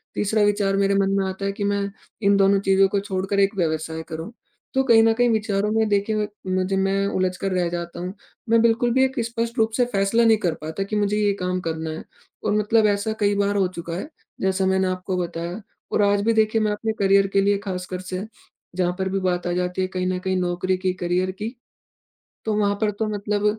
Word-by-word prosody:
तीसरा 210 +1 +1
विचार 200 -1 +2
मेरे 200 0 +2
मन 195 0 +2
में 195 - +1
आता 190 +1 -5
है 200 - 0
कि 205 +1 -5
मैं 200 0 0 0.3
इन 200 0 +5
दोनों 195 0 +4
चीज़ों 195 0 +4
को 200 +1 0
छोड़कर 195 0 -2
एक 195 +1 +3
व्यवसाय 160 -2 -1
करूँ। 160 +7 -6 0.4
तो 265 0 +2
कहीं 230 -3 +6
न 225 - +4
कहीं 245 +1 +2
विचारों 210 -2 0
में 220 0 +2
देखिए 210 +1 +1 0.2
मुझे 185 +1 0
मैं 195 +1 +1
उलझकर 185 +1 -1
रह 180 -2 +1
जाता 170 0 -5
हूँ। 180 +1 -4 0.4
मैं 230 0 +5
बिल्कुल 235 +1 +3
भी 265 0 +4
एक 265 0 -3
स्पष्ट 235 +1 -3
रूप 225 -1 +2
से 245 - +4
फैसला 220 +1 +2
नहीं 225 -1 +5
कर 170 - +2
पाता 160 +5 -3
कि 205 +2 -4
मुझे 210 0 +1
यह 205 -1 +2
काम 180 0 -1
करना 160 0 -3
है 155 +1 -6 0.4
और 205 - +1
मतलब 215 +1 +3
ऐसा 200 +2 -2
कई 205 -1 +2
बार 200 0 +1
हो 195 -2 +2
चुका 170 0 -5
है 195 - -5 0.3
जैसा 190 0 +1
मैंने 190 0 +2
आपको 185 0 -2
बताया 175 +2 -4 0.3
और - - +2
आज 200 0 +3
भी 230 - +3
देखिए 220 0 +2
मैं 215 -1 +1
अपने 220 +1 -2
करियर 195 0 +4
के 195 - +4
लिए 200 +1 +2
खास 180 -1 -3
कर 180 - -2
से 185 +2 -3 0.5
जहाँ 180 -1 +1
पर 190 0 0
भी 195 - -1
बात 180 -2 -1
आ - - 0
जाती 180 +1 -1
है 185 - 0
कहीं 185 -1 -3
ना 185 0 0
कहीं 190 +1 -1
नौकरी 180 +1 0
की, 185 0 -1
करियर 180 +1 -1
की, 215 +6 -6 0.9
तो 220 - 0
वहाँ 205 -1 +2
पर 215 - +2
तो 215 +2 -2
मतलब 205 0 -1
195 Hz, 230 wpm, -23 LUFS, 185-210 Hz, 0.9 s, कहीं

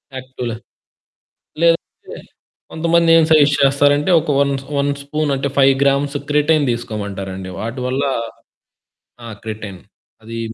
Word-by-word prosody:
యాక్టివ్‌ల 130 -2 -6 1.1
లేదంటే 165 0 0 0.6
కొంతమంది 170 +1 +2
ఏం 165 - +5
సజెస్ట్ 150 -2 +5
చేస్తారంటే 145 +3 +3
ఒక 155 - -9
వన్ 140 0 +2 0.3
వన్ 140 0 +1
స్పూనంటే 140 -1 -2
5 135 0 +6
గ్రామ్స్ 140 +1 +1
క్రిటైన్ 150 +1 +2
తీసుకోమంటారండి. 100 -5 -5
వాటివల్ల 125 +4 -3 1.2
ఆ! - - -8 0.2
క్రిటైన్. 105 -4 -7 0.4
అది 115 +1 -7
140 Hz, 105 wpm, -18 LUFS, 115-150 Hz, 1.2 s, 5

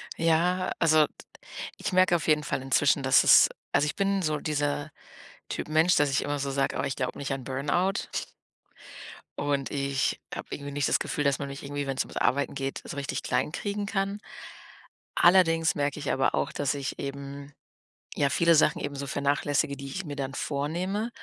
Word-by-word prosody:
Ja, 170 +3 +2
also, 155 -2 +5 0.7
ich - - -3
merke 185 -1 +5
auf 165 - -2
jeden 150 -1 +3
Fall 140 - -2
inzwischen, 135 +1 +2
dass 130 0 +5
es - - +7 0.2
also, - - +3
ich 150 - -2
bin 195 -1 +1
so 155 -2 0
dieser 145 0 -2 0.6
Typ - - -4
Mensch, 160 +4 +4
dass 145 -1 +3
ich 140 - +1
immer 145 0 -2
so 140 0 -2
sage: 135 0 0
„Oh, - - 0
ich 130 - -2
glaube 125 -2 -3
nicht 140 - -3
an 135 -2 -4
Burnout.“ 150 +9 -1 1.3
Und 140 -1 -1
ich 140 -1 -1
habe - - -6
irgendwie 140 0 -6
nicht 140 0 0
das - - +4
Gefühl, 145 - -2
dass 140 -1 +2
man 140 - -4
mich 140 0 -7
irgendwie, 145 0 -3
wenn's 135 -1 -1
ums - - -10
Arbeiten 140 +4 +1
geht, 135 0 -3
so - - -7
richtig 140 0 -3
klein - - 0
kriegen 205 +3 -3
kann. 200 0 -2 1.0
Allerdings 165 -2 +4
merke 145 0 -1
ich 145 - -3
aber 135 - +1
auch, 140 - 0
dass 145 0 -1
ich 140 -1 -4
eben 140 +1 -7 0.6
ja, 140 - +2
viele 170 +4 +4
Sachen 160 - +4
eben 145 0 -4
so 140 0 -5
vernachlässige, 140 0 0
die 140 0 -8
ich 180 +8 -5
mir 145 -2 -5
dann 135 -1 -4
vornehme 175 +10 -2
145 Hz, 190 wpm, -27 LUFS, 140-165 Hz, 1.3 s, es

